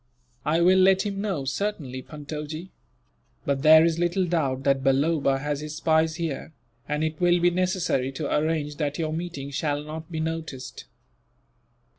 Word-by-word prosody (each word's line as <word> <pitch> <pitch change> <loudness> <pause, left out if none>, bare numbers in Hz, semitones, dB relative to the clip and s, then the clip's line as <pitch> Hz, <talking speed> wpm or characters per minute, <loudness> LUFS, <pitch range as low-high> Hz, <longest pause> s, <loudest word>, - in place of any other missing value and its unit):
"I 160 +3 +2
will 185 +2 +5
let 190 0 +5
him 200 -1 -3
know, 190 -10 -2
certainly, 135 -4 -3
Puntojee; 150 +4 -7 0.7
but 140 -1 0
there 155 +2 +8
is 165 0 +1
little 175 +2 +1
doubt 140 -7 0
that 135 -1 +2
Balloba 140 +1 +2
has 145 +1 -2
his 150 0 -6
spies 160 0 +2
here, 160 -2 -4 0.4
and 150 +1 0
it 155 0 -3
will 175 0 +4
be 175 +1 +4
necessary 180 -7 0
to 145 +1 -2
arrange 150 -1 -1
that 145 -2 -2
your 155 -2 -2
meeting 160 -4 -5
shall 145 +1 -1
not 155 +2 -8
be 160 - -3
noticed. 160 -4 -5
155 Hz, 160 wpm, -25 LUFS, 145-170 Hz, 0.7 s, there